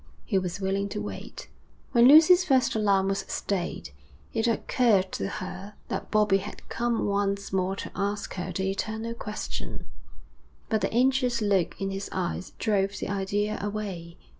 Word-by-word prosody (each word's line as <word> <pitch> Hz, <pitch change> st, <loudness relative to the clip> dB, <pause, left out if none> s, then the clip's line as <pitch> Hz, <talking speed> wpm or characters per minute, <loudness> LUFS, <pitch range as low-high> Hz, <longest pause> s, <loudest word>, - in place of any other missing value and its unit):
He 190 Hz, -, +2 dB
was 185 Hz, 0 st, -4 dB
willing 195 Hz, +1 st, -1 dB
to 210 Hz, -, -4 dB
wait. -, -, -7 dB, 0.4 s
When 240 Hz, -1 st, +6 dB
Lucy's 325 Hz, +6 st, +8 dB
first 265 Hz, -7 st, +3 dB
alarm 200 Hz, -3 st, +2 dB
was 195 Hz, 0 st, 0 dB
stayed, 175 Hz, -, -3 dB, 0.4 s
it 225 Hz, 0 st, +1 dB
occurred 225 Hz, -4 st, +2 dB
to 95 Hz, -, -2 dB
her 195 Hz, -, -6 dB
that -, -, -3 dB
Bobbie 210 Hz, -2 st, +3 dB
had 205 Hz, +2 st, -9 dB
come 235 Hz, -1 st, 0 dB
once 200 Hz, -1 st, -1 dB
more 190 Hz, 0 st, +1 dB
to -, -, -6 dB
ask 205 Hz, +1 st, -2 dB
her 180 Hz, 0 st, -4 dB
the 190 Hz, +2 st, -1 dB
eternal 220 Hz, +3 st, -3 dB
question, 210 Hz, -2 st, -6 dB, 0.8 s
but 220 Hz, -2 st, +1 dB
the -, -, 0 dB
anxious 250 Hz, 0 st, +2 dB
look 200 Hz, -5 st, +1 dB
in 195 Hz, 0 st, -2 dB
his 195 Hz, +1 st, -4 dB
eyes 185 Hz, 0 st, -3 dB
drove 200 Hz, -2 st, 0 dB
the -, -, -4 dB
idea 200 Hz, +2 st, -1 dB
away. 195 Hz, -5 st, -5 dB
200 Hz, 160 wpm, -27 LUFS, 195-220 Hz, 0.8 s, Lucy's